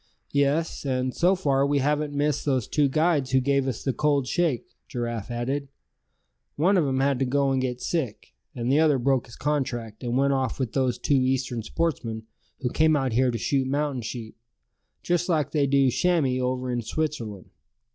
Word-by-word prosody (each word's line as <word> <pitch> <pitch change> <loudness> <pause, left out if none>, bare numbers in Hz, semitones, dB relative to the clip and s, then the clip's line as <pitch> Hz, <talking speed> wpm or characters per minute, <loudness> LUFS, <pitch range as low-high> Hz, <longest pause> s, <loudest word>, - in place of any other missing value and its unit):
"Yes; 145 +3 +1
and 130 -2 -1
so 180 +3 +3
far 140 -7 +1
we 140 +1 +2
haven't 150 +2 0
missed 145 0 0
those 130 -5 0
two 145 -2 +2
guides 155 -2 +1
who 130 - +3
gave 140 +1 +1
us 125 -4 -3
the 135 - 0
cold 145 +1 +1
shake," 155 -4 0 0.2
Giraffe 120 -3 -4
added. 130 +4 -2 0.9
"One 180 +7 +3
of 170 -6 +3
'em 135 0 0
had 135 -2 +1
to 135 - +2
go 140 +1 +1
and 130 -1 +1
get 125 -1 -3
sick; 140 -11 -3 0.2
and 120 +1 -1
the 145 - +4
other 155 -3 +4
broke 130 0 +1
his 115 - -12
contract, 120 -7 -2
and 120 0 -1
went 140 +1 +3
off 130 -2 -1
with 125 -5 -2
those 130 -3 +1
two 140 -2 +2
Eastern 130 -2 0
sportsmen 115 -4 -2 0.4
who 125 -2 -1
came 155 0 +3
out 135 -4 0
here 130 +2 +3
to 120 - -1
shoot 135 +4 0
mountain 140 -1 -1
sheep, 115 0 -6 0.7
just 175 +1 0
like 150 -4 +1
they 145 -3 +2
do 135 -1 +3
chamois 150 -6 +1
over 125 0 -1
in 120 -1 -1
Switzerland. 115 - -4
135 Hz, 190 wpm, -25 LUFS, 125-145 Hz, 0.9 s, the